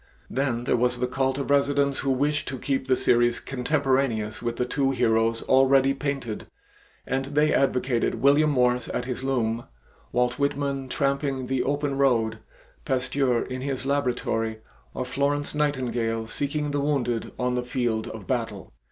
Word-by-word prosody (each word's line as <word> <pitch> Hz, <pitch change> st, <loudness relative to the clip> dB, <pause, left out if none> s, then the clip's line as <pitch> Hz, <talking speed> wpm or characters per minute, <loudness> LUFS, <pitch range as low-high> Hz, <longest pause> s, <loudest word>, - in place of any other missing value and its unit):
Then 130 Hz, -3 st, -1 dB
there -, -, +2 dB
was 125 Hz, +1 st, +1 dB
the 125 Hz, -, 0 dB
cult 130 Hz, +1 st, 0 dB
of 140 Hz, 0 st, -2 dB
residents 140 Hz, 0 st, +2 dB
who 135 Hz, -, -1 dB
wished 145 Hz, +3 st, +1 dB
to 135 Hz, -, -4 dB
keep 135 Hz, +1 st, -2 dB
the 130 Hz, -, +4 dB
series 120 Hz, -1 st, +3 dB
contemporaneous 130 Hz, -5 st, 0 dB
with 120 Hz, 0 st, -2 dB
the 125 Hz, -, 0 dB
two 135 Hz, +2 st, 0 dB
heroes 115 Hz, -3 st, +1 dB
already 135 Hz, +1 st, +4 dB
painted, 135 Hz, -6 st, -4 dB, 0.6 s
and 135 Hz, 0 st, -1 dB
they 150 Hz, +2 st, +2 dB
advocated 130 Hz, -2 st, +1 dB
William 145 Hz, +3 st, +4 dB
Morris 125 Hz, -3 st, +2 dB
at -, -, -2 dB
his 125 Hz, 0 st, -4 dB
loom, 120 Hz, -3 st, 0 dB, 0.5 s
Walt 125 Hz, +2 st, +1 dB
Whitman 140 Hz, -1 st, -1 dB
tramping 140 Hz, -1 st, -1 dB
the 130 Hz, 0 st, 0 dB
open 140 Hz, 0 st, -1 dB
road, 115 Hz, -5 st, +2 dB, 0.4 s
Pasteur 130 Hz, -1 st, +1 dB
in 130 Hz, 0 st, -5 dB
his 135 Hz, -1 st, -3 dB
laboratory, 120 Hz, -5 st, 0 dB, 0.4 s
or 130 Hz, -, -2 dB
Florence 145 Hz, +2 st, -1 dB
Nightingale 120 Hz, -6 st, -1 dB
seeking 145 Hz, +5 st, -2 dB
the 145 Hz, 0 st, 0 dB
wounded 125 Hz, -6 st, -1 dB
on 125 Hz, 0 st, 0 dB
the 125 Hz, -, 0 dB
field 120 Hz, -3 st, -1 dB
of -, -, -8 dB
battle. -, -, -3 dB
130 Hz, 155 wpm, -25 LUFS, 120-140 Hz, 0.6 s, the